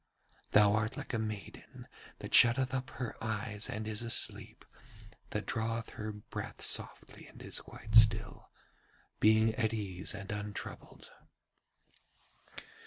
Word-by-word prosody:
Thou 105 -1 +6
art 110 +1 -1
like - - -6
a 115 - 0
maiden 110 -4 -7 0.3
that - - -9
shutteth 130 +2 +6
up 130 -1 -2
her 120 -3 -6
eyes 105 -1 -3
and 110 0 -4
is 110 0 -3
asleep, 115 -1 -1 0.6
that - - -3
draweth 115 0 -2
her 110 0 -5
breath 105 0 -8
softly - - -2
and - - -15
is - - -2
quite 110 - -11
still, 110 0 +4 0.7
being 110 +1 +4
at 110 0 0
ease 95 -2 -1
and 100 +1 -7
untroubled. 105 -1 -7
110 Hz, 125 wpm, -32 LUFS, 105-115 Hz, 0.7 s, Thou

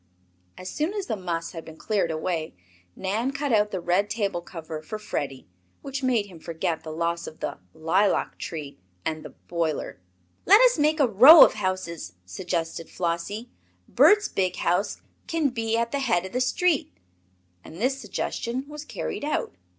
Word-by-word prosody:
As 185 - -8
soon 310 - -2
as 405 -3 -2
the 225 - -2
muss 170 -4 -3
had 165 -2 -7
been 160 0 -12
cleared 205 -4 0
away 160 - -3 0.4
Nan 210 +7 -1
cut 280 -2 -2
out 210 -1 +3
the 190 - -3
red 180 +4 +1
table 200 -6 -1
cover 160 -3 -7
for 215 +7 -6
Freddie, 140 -10 -4 0.4
which 275 -1 -4
made 245 -5 +2
him 180 -5 -13
forget 160 0 -3
the 160 - -8
loss 170 +1 -2
of 160 - -10
the - - -4 0.2
"lilac 185 +6 +1
tree" 145 - -6 0.3
and 155 -1 -2
the - - -9
"boiler." 165 - -3 0.5
"Let 400 +4 +9
us - - +5
make 305 +2 +2
a 275 - +5
row 260 - +10
of - - 0
houses," 185 - -3
suggested 165 - -4
Flossie. 185 +7 -3 0.4
"Bert's 415 0 +5
big 185 -2 -1
house 180 +4 0 0.2
can 325 -4 +1
be 225 -2 -1
at 235 0 0
the 280 - -1
head 205 -10 +1
of 190 - -7
the 250 - -1
street." 290 - +1 0.7
And - - -12
this 265 +4 0
suggestion 250 +3 -3
was 300 0 -8
carried 300 - -5
out. 300 - -1
195 Hz, 175 wpm, -25 LUFS, 170-255 Hz, 0.7 s, row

